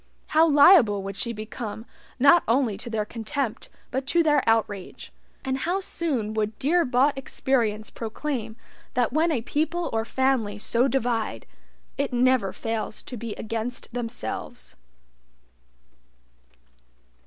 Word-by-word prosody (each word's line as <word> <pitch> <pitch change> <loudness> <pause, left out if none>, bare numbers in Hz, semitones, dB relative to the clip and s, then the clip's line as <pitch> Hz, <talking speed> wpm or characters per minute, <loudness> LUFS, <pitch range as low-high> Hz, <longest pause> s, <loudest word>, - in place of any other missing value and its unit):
How 320 +1 +5
liable 285 - +6
would 195 0 -5
she 235 +4 -2
become 220 0 -6 0.3
not 280 +6 +6
only 235 -2 +2
to 230 +4 -6
their 215 -2 -1
contempt 235 +2 -4 0.2
but 265 +1 -2
to 335 +4 +3
their 295 -3 +4
outrage, 210 -4 -1 0.3
and 265 0 -1
how 350 +7 0
soon 280 - -2
would 215 0 -2
dear 340 +6 +2
bought 260 +3 +3
experience 235 -5 -1
proclaim 230 -1 -4 0.4
that 245 -1 +1
when 325 +3 +2
a 245 -7 -1
people 320 +6 -1
or 225 0 +1
family 240 -4 0
so 235 +4 +2
divide, 230 - -1 0.5
it - - 0
never 245 -5 +2
fails 225 0 -4
to 250 - -7
be 230 -1 -5
against 230 +2 -5
themselves. 235 - -5
240 Hz, 130 wpm, -25 LUFS, 220-275 Hz, 0.5 s, liable